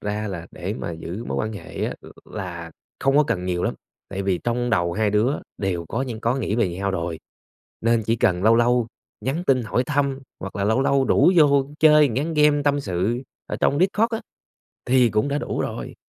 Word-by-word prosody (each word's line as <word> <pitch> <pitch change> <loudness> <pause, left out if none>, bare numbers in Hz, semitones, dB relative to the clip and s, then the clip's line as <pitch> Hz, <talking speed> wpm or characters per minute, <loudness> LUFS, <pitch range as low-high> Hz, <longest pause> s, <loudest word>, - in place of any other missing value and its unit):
ra 105 0 -3
là 85 -3 -6
để 90 +4 -5
mà 85 - -4
giữ 85 +7 -6
mối - - -3
quan 110 0 -2
hệ 105 - -5
á - - -3
l - - -16 0.3
là 85 -5 -6 0.3
không 135 +1 +2
có 150 - +6
cần 95 -6 -1
nhiều 90 -1 -1
lắm, - - 0 0.3
tại 100 0 -4
vì 95 -2 0
trong 120 0 0
đầu 85 -5 +1
hai 105 +1 +1
đứa 110 +7 +2 0.2
đều 90 -4 -2
có 120 +4 -1
những 115 -4 -5
có 115 +2 +1
nghĩ 110 -5 -1
về 115 -6 +2
nhau 95 +3 -2
rồi, 85 -3 -3 0.6
nên 115 0 +2
chỉ 115 +1 +2
cần 90 -4 +1
lâu 115 +1 +6
lâu 120 0 +3 0.3
nhắn 140 +10 -2
tin 130 -3 +3
hỏi 120 +3 0
thăm, 140 -2 0 0.2
hoặc - - -6
là 100 - -1
lâu 110 +6 +2
lâu 140 -1 +3
rủ 180 - +4
vô 140 -3 +5
chơi 150 -2 +7
một 110 - -4
ván 160 +4 -1
game 150 -1 +4
tâm 145 0 +2
sự 100 +3 -1 0.3
ở - - -4
trong 140 - +2
Discord 210 +5 +2
á 225 - -3 0.7
thì 125 -1 +4
cũng 105 +7 +1
đã 145 +1 0
đủ - - -3
rồi. - - -4
115 Hz, 225 wpm, -23 LUFS, 95-140 Hz, 0.7 s, chơi